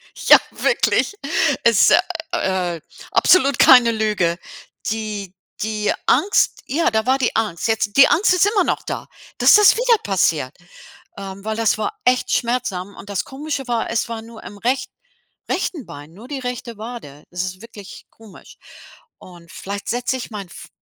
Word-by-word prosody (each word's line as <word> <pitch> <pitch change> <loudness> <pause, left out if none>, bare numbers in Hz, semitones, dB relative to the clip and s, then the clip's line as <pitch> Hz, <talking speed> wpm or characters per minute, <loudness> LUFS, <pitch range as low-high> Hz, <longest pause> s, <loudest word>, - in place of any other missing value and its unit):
Ja, - - +7
wirklich. 475 - 0 0.5
Es - - +5
ist, - - +6 0.3
äh, 180 -4 -2 0.3
absolut 280 -7 +3
keine 245 -3 +7
Lüge. 210 -6 0 0.5
Die 210 -3 -5 0.3
die 215 -1 -1
Angst 410 +2 +2
ja, 325 +5 0
da 220 0 -1
war 260 +1 +2
die 250 - 0
Angst. 215 -3 -1
Jetzt 220 -2 -1
die 275 - +8
Angst 365 +1 +3
ist 365 +2 +3
immer 410 -2 +2
noch - - -1
da, - - -6 0.3
dass - - +6
das 420 -2 +6
wieder 480 -1 +3
passiert. 160 -8 0 0.6
Ähm, 195 0 -8
weil 220 0 -2
das 225 -2 +1
war 215 - -4
echt 250 0 +1
schmerzhaft 220 -6 -2
und 205 - -12
das 200 - -3
Komische 275 -1 -5
war, 235 -2 -2
es 230 0 -1
war 225 -1 -5
nur 230 -1 -13
im 205 - -10
recht 255 +4 -1 0.6
rechten 345 - -3
Bein, 145 +3 -12
nur 215 +7 -13
die 280 -1 -5
rechte 245 -2 -6
Wade. 215 - -9
Es 180 0 -3
ist 185 +1 -6
wirklich 215 -4 -12
komisch. 220 -3 -16 0.6
Und 175 -2 -15
vielleicht 200 +1 -7
setze 245 +2 -1
ich 240 - -8
meinen 200 -3 -7
F 175 - -12
220 Hz, 165 wpm, -20 LUFS, 195-255 Hz, 0.6 s, die